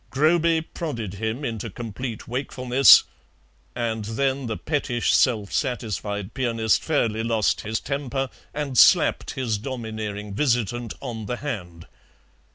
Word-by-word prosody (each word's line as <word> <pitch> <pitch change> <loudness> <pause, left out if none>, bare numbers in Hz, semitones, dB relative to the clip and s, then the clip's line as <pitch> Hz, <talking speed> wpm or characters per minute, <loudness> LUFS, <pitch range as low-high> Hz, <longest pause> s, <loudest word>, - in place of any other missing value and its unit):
Groby 160 +4 +3
prodded 120 - -5
him 110 +7 -3
into 115 -1 -4
complete 115 +2 -6
wakefulness, 130 +1 +5 0.7
and 115 -2 -2
then 135 +4 -1
the 110 - -3
pettish 140 -6 0
self 110 -6 +2
satisfied 105 - -2
pianist 115 -4 +1
fairly 115 -8 0
lost 115 -2 +1
his 110 +1 -2
temper 135 -1 -3 0.2
and 140 -4 -1
slapped - - +5
his 115 -5 -1
domineering 110 -4 -5
visitant 120 -1 0
on 115 -5 -5
the 120 - -2
hand. 90 - -6
120 Hz, 120 wpm, -24 LUFS, 110-135 Hz, 0.7 s, wakefulness